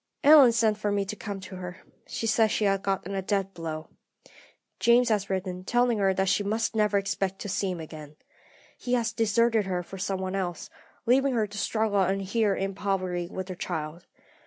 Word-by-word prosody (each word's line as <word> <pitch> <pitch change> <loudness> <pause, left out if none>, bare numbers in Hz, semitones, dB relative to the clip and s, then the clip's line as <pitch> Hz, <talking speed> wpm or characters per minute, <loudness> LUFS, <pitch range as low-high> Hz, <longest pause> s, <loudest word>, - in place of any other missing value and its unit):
"Ellen 290 -4 +8
sent 220 -2 +2
for 210 -1 -1
me 200 -1 0
to 210 - -5
come 205 -2 -6
to 190 0 -9
her. 180 0 -7 0.3
She - - -4
says 220 0 +3
she 210 - 0
has 195 -1 +2
got 195 -2 -2
a 195 -1 -2
death 195 0 -1
blow. 160 -2 -6 0.9
James 235 +1 +4
has 205 -3 0
written, 185 -1 -3
telling 240 +1 +2
her 195 -1 +3
that 190 0 0
she 200 - +2
must 220 +2 -1
never 210 -1 +2
expect 195 -1 -1
to - - -5
see 195 0 -1
him 180 -2 -4
again. 155 -2 -9 0.6
He 245 - -3
has 230 -3 +1
deserted 225 -1 +2
her 180 -1 -1
for 190 +2 -10
some 190 0 -2
one 185 0 -3
else, 180 -3 -4 0.3
leaving 265 +2 +3
her 220 -2 +2
to 205 0 -9
struggle 215 -2 0
on 195 +1 +2
here 200 +1 +1
in 195 0 -2
poverty 185 -3 -2
with 185 0 -5
her - - -3
child. 165 -1 -5
195 Hz, 205 wpm, -27 LUFS, 185-220 Hz, 0.9 s, Ellen